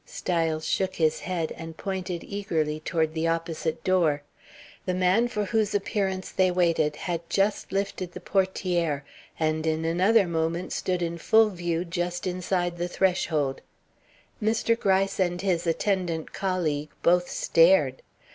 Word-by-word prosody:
Styles 165 Hz, -3 st, -1 dB
shook 190 Hz, -1 st, 0 dB
his 160 Hz, -2 st, +2 dB
head, 170 Hz, -4 st, -3 dB
and 165 Hz, -1 st, -8 dB
pointed 185 Hz, -3 st, -4 dB
eagerly 160 Hz, -7 st, -2 dB
toward 160 Hz, 0 st, -1 dB
the 160 Hz, +1 st, 0 dB
opposite 165 Hz, -1 st, -2 dB
door. 165 Hz, -6 st, +2 dB, 0.6 s
The 180 Hz, -, 0 dB
man 185 Hz, +6 st, +3 dB
for 210 Hz, -3 st, -2 dB
whose 215 Hz, -1 st, 0 dB
appearance 195 Hz, -2 st, -1 dB
they 185 Hz, -1 st, +3 dB
waited 165 Hz, -4 st, +2 dB
had 170 Hz, +1 st, -3 dB
just 200 Hz, +1 st, 0 dB
lifted 195 Hz, -2 st, -2 dB
the -, -, -7 dB
portière 180 Hz, -6 st, 0 dB, 0.4 s
and 155 Hz, 0 st, 0 dB
in 160 Hz, 0 st, 0 dB
another 190 Hz, +6 st, +4 dB
moment 170 Hz, +1 st, -2 dB
stood 180 Hz, -1 st, -1 dB
in 170 Hz, 0 st, -3 dB
full 220 Hz, +5 st, +5 dB
view 175 Hz, -2 st, -2 dB
just 175 Hz, 0 st, -3 dB
inside 180 Hz, -1 st, -1 dB
the 175 Hz, -, -1 dB
threshold. 165 Hz, -7 st, 0 dB, 0.8 s
Mr. 225 Hz, +2 st, +2 dB
Gryce 195 Hz, -1 st, +1 dB
and 175 Hz, -1 st, +1 dB
his 180 Hz, -3 st, 0 dB
attendant 170 Hz, -2 st, -1 dB
colleague 160 Hz, -6 st, -1 dB
both 175 Hz, +1 st, +3 dB
stared. 165 Hz, -6 st, +4 dB
175 Hz, 140 wpm, -26 LUFS, 165-190 Hz, 0.8 s, full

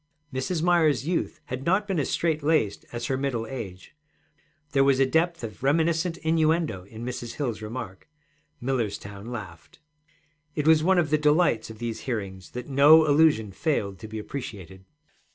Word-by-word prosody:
Mrs. 155 Hz, +6 st, -2 dB
Myers's 160 Hz, -6 st, +3 dB
youth 170 Hz, +1 st, -2 dB
had 125 Hz, +1 st, -5 dB
not 190 Hz, +6 st, +1 dB
been 190 Hz, -5 st, 0 dB
as 140 Hz, -, -1 dB
strait 160 Hz, -2 st, 0 dB
laced 145 Hz, -9 st, +1 dB
as 120 Hz, 0 st, -4 dB
her 130 Hz, -, -1 dB
middle 130 Hz, -5 st, -1 dB
age; 110 Hz, -4 st, -8 dB, 0.8 s
there 135 Hz, -1 st, +4 dB
was 135 Hz, -1 st, +3 dB
a 135 Hz, -, +5 dB
depth 165 Hz, +3 st, +1 dB
of 110 Hz, 0 st, -7 dB
reminiscent 165 Hz, +4 st, +1 dB
innuendo 160 Hz, -, +1 dB
in 110 Hz, +3 st, -9 dB
Mrs. 120 Hz, -1 st, -5 dB
Hill's 120 Hz, -7 st, -3 dB
remark. 110 Hz, 0 st, -7 dB, 0.5 s
Millerstown 110 Hz, -5 st, -3 dB
laughed. 90 Hz, -9 st, -8 dB, 0.8 s
It 150 Hz, -, -1 dB
was 160 Hz, -1 st, +6 dB
one 190 Hz, +2 st, +4 dB
of 155 Hz, -4 st, +1 dB
the 155 Hz, -, +3 dB
delights 150 Hz, -7 st, +2 dB
of 110 Hz, -, -9 dB
these 115 Hz, 0 st, -4 dB
hearings 95 Hz, -5 st, -4 dB
that 125 Hz, 0 st, -6 dB
no 150 Hz, +3 st, +6 dB
allusion 145 Hz, -8 st, +4 dB
failed 100 Hz, -, -1 dB
to 110 Hz, -, -8 dB
be 110 Hz, 0 st, -7 dB
appreciated. 95 Hz, -6 st, -7 dB
135 Hz, 165 wpm, -26 LUFS, 110-160 Hz, 0.8 s, was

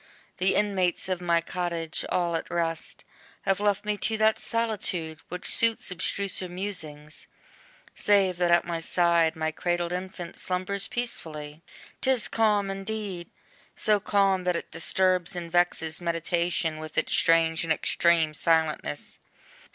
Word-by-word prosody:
The 185 Hz, +1 st, +2 dB
inmates 190 Hz, -3 st, +1 dB
of 185 Hz, -1 st, -1 dB
my 170 Hz, -1 st, +2 dB
cottage, 170 Hz, -2 st, -3 dB
all 175 Hz, -2 st, 0 dB
at 165 Hz, -, -3 dB
rest, 165 Hz, -2 st, -3 dB, 0.4 s
Have 195 Hz, 0 st, +1 dB
left 205 Hz, 0 st, +1 dB
me 210 Hz, 0 st, 0 dB
to 220 Hz, +2 st, 0 dB
that 220 Hz, 0 st, +3 dB
solitude, 190 Hz, -9 st, -1 dB
which 180 Hz, +1 st, -6 dB
suits 230 Hz, -3 st, +3 dB
Abstruser 185 Hz, +1 st, -1 dB
musings: 165 Hz, -6 st, -6 dB, 0.7 s
save 195 Hz, -3 st, +2 dB
that 175 Hz, -1 st, +2 dB
at 170 Hz, 0 st, +4 dB
my 170 Hz, -1 st, -2 dB
side 170 Hz, -1 st, +2 dB
My 160 Hz, 0 st, -1 dB
cradled 175 Hz, +1 st, -1 dB
infant 180 Hz, -1 st, -5 dB
slumbers 185 Hz, +2 st, -2 dB
peacefully. 155 Hz, -10 st, -4 dB, 0.4 s
'Tis 260 Hz, -3 st, +2 dB
calm 210 Hz, -3 st, +2 dB
indeed! 195 Hz, -3 st, -5 dB, 0.5 s
so 210 Hz, -1 st, +3 dB
calm, 195 Hz, -2 st, +2 dB
that 180 Hz, -1 st, +2 dB
it -, -, -5 dB
disturbs 180 Hz, +2 st, +1 dB
And 170 Hz, -1 st, -5 dB
vexes 175 Hz, -2 st, +1 dB
meditation 170 Hz, -1 st, -1 dB
with 155 Hz, 0 st, -9 dB
its 155 Hz, -, +1 dB
strange 165 Hz, -1 st, +3 dB
And 165 Hz, -, -2 dB
extreme 160 Hz, 0 st, +2 dB
silentness. 160 Hz, 0 st, 0 dB
175 Hz, 135 wpm, -27 LUFS, 165-195 Hz, 0.7 s, at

